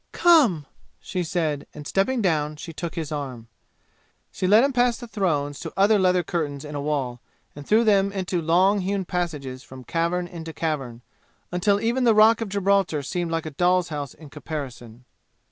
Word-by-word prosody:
"Come!" 270 - +4 0.3
she 180 -1 -3
said, 160 -4 -2
and 150 -1 -9
stepping 225 - 0
down 155 -4 0
she 165 +2 -9
took 170 +1 -5
his 160 -3 -4
arm. 130 -6 -5 0.8
She 185 - -2
led 215 +5 +6
him 275 0 +1
past 245 -1 +2
the 240 - -8
thrones 150 -10 -1
to - - -6
other 205 +2 +4
leather 180 -1 +3
curtains 150 -4 -3
in 150 - -8
a 145 - -3
wall, 135 -5 -2 0.3
and 145 -1 -10
through 220 +2 +4
them 200 -3 +3
into 185 -3 -2
long 185 +5 +3
hewn 195 0 -2
passages 150 -8 -3
from 130 -1 -12
cavern 170 +4 -1
into 165 -2 -8
cavern, 135 -8 -3 0.5
until 200 +3 +2
even 240 +4 0
the 230 -3 +4
Rock 220 +1 +6
of 225 - -3
Gibraltar 195 -6 +1
seemed 175 +5 -3
like 165 -1 -2
a 155 - -5
doll's 180 +3 +2
house 145 -4 -5
in 155 -3 -14
comparison. 130 -6 -7
170 Hz, 180 wpm, -24 LUFS, 145-200 Hz, 0.8 s, led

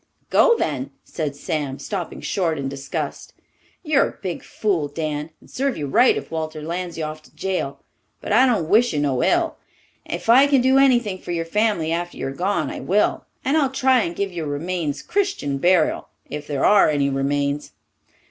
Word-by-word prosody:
"Go, 470 -2 +5
then!" 140 -3 -2
said 150 -4 -4
Sam, 145 -2 -3
stopping 185 -1 -5
short 170 -5 -1
in 140 -1 -3
disgust. 135 0 -5 0.5
"You're 305 -4 +3
a - - -15
big 185 -4 -4
fool, 185 -9 -1
Dan, 150 0 -4
and - - -20
serve 270 0 -2
you 150 - -3
right 245 - +4
if - - -7
Walters 155 -1 -4
lands 170 0 -4
you 160 - -3
off 155 0 -5
to - - -22
jail; 185 -8 -3 0.4
but - - -6
I 255 +4 +6
don't 210 -11 +1
wish 230 +5 +4
you 150 - 0
no 135 -4 +1
ill. 340 -1 +1 0.5
If - - -5
I 260 +5 +7
can 275 -3 +4
do 260 +2 +4
anything 240 -8 +3
for - - -12
your 165 -1 -1
family 205 -3 +1
after 175 +1 -3
you're 135 - -3
gone, 190 +7 -1
I - - -6
will, 205 +3 +1 0.2
and 275 +3 +2
I'll 290 -4 +3
try 260 -1 +3
and 170 -4 -3
give 200 +1 -2
your 165 -3 -4
remains 150 0 -3
Christian 380 - -1
burial 175 0 +2 0.2
if 150 0 -6
there 140 -2 0
are 205 -5 +6
any 145 -2 +1
remains. 140 +1 -1
170 Hz, 190 wpm, -22 LUFS, 145-225 Hz, 0.5 s, I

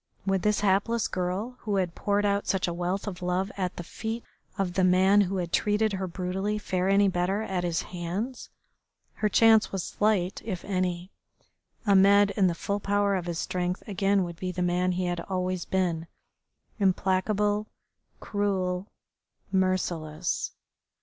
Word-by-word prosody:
Would 195 -1 +1
this 210 +2 +1
hapless 210 +3 +2
girl 190 +7 -3
who 210 -2 -2
had 185 -3 0
poured 205 +2 0
out 200 0 +1
such 190 -2 +1
a 175 - -2
wealth 180 +3 -2
of 185 -3 -5
love 180 +2 -1
at 185 -2 -2
the 175 - -6
feet 225 +6 -5 0.3
of 190 -3 -1
the 190 - +1
man 190 +3 +5
who 195 0 0
had 175 -2 -3
treated 210 0 +2
her 190 -1 -2
brutally 190 +4 -2
fare 185 -2 -1
any 200 +1 +5
better 190 +3 0
at 185 -4 -2
his 170 -2 0
hands? 185 +9 -5 0.6
Her 215 - 0
chance 220 +1 +5
was 195 -3 -2
slight, 205 -3 0
if 195 -6 -5
any. 185 -1 -2 0.7
Ahmed 200 0 +6
in 195 -1 +3
the 170 - 0
full 200 +4 -2
power 205 0 +1
of 180 -2 -2
his 170 -1 -2
strength 180 +1 -2
again 195 -1 +1
would 170 -1 -6
be 185 +1 -3
the 180 0 -2
man 180 +1 +1
he 180 +1 -1
had 175 -1 -1
always 185 -1 -2
been, 170 -3 -1 0.7
implacable, 205 +2 +1 0.5
cruel, 190 -2 -1 0.6
merciless. 180 -4 -1
190 Hz, 160 wpm, -27 LUFS, 180-205 Hz, 0.7 s, Ahmed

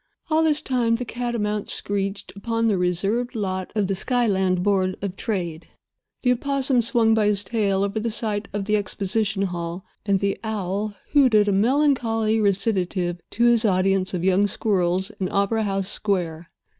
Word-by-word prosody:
All 315 +1 +4
this 310 -2 +2
time 240 -3 +1
the 245 +2 -4
catamount 225 -4 -2
screeched 195 -2 -3
upon 230 +3 -1
the 205 -3 +2
reserved 195 +8 0
lot 190 -3 -3
of 210 -2 +1
the 195 - -1
Skyland 190 -5 +1
Board 190 -2 +1
of 195 -2 -4
Trade, 175 -7 -3 0.6
the 250 - +4
opossum 265 0 +1
swung 225 -1 +2
by 215 -2 +3
his 205 -1 +1
tail 200 -2 0
over 200 +2 -1
the 230 +2 -1
site 210 -2 -2
of 200 -1 -3
the 210 +1 +1
exposition 200 0 -1
hall, 175 -1 -4 0.2
and 195 -1 +3
the 200 0 -1
owl 205 -1 -3 0.2
hooted 245 -8 +5
a - - +3
melancholy 225 -1 +2
recitative 185 -3 0
to 235 - +1
his 240 -1 +4
audience 190 -2 +2
of 175 - -3
young 190 +2 +3
squirrels 190 -1 0
in 185 -2 -1
opera 205 +2 +1
house 195 -1 -1
square. 175 -6 -2
205 Hz, 165 wpm, -23 LUFS, 190-225 Hz, 0.6 s, hooted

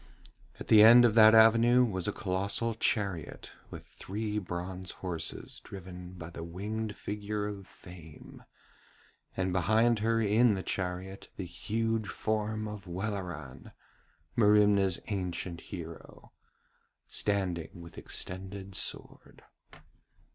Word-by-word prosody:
At - - -8
the 110 -1 +7
end 120 +2 +9
of 115 - +3
that 110 0 +8
avenue 115 +3 +6
was 95 -5 -2
a - - +1
colossal 100 +4 -1
chariot 100 -6 -2 0.2
with - - -10
three 105 +2 -4
bronze 90 0 -5 0.2
horses 85 -3 -5
driven 90 -1 -9
by 85 -2 -9
the 85 - -7
winged 105 +5 -4
figure 105 0 -4
of 100 -2 -6
Fame, 85 -5 -13 0.9
and 95 -1 0
behind 110 +5 +3
her 115 +1 +1
in 110 +1 +3
the 95 - -4
chariot 95 +1 -4
the 95 - -4
huge 110 +5 -2
form 110 0 -2
of 105 -3 -8
Welleran, 90 -8 -5 0.6
Merimna's 105 -4 +4
ancient 90 -3 -3
hero, 85 -3 -9 0.7
standing 95 -5 -1
with 85 -2 -10
extended 95 +1 -5
sword. - - -4
100 Hz, 115 wpm, -30 LUFS, 90-110 Hz, 0.9 s, end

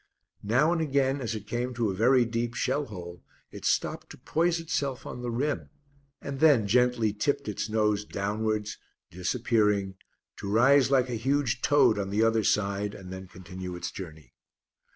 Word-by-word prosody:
Now 125 +10 +2
and 170 - 0
again 140 -2 +1
as 115 -2 -3
it 105 -1 -7
came 120 +3 -3
to 115 -4 0
a - - -5
very 125 +4 +4
deep 115 0 -2
shell 140 +3 0
hole 90 - -9 0.3
it - - -9
stopped - - 0
to - - -11
poise 170 +1 0
itself 140 -5 -3
on 125 - -7
the 120 - -3
rim 140 +5 -2 0.5
and 140 -1 -5
then 145 -9 +5
gently 120 0 +2
tipped 140 +5 -1
its 105 +1 -3
nose 105 -1 +1
downwards, 105 +1 -2 0.3
disappearing, 100 0 0 0.4
to 100 - -5
rise 130 +5 +5
like 130 -2 +3
a 115 -2 -3
huge 135 -2 0
toad 145 -7 +4
on 95 -1 -2
the 105 +3 +1
other 115 -1 +2
side, 100 0 0
and 95 -1 -9
then 95 0 -8
continue 90 0 -8
its 90 - -5
journey. 80 -5 -10
115 Hz, 175 wpm, -28 LUFS, 100-130 Hz, 0.5 s, then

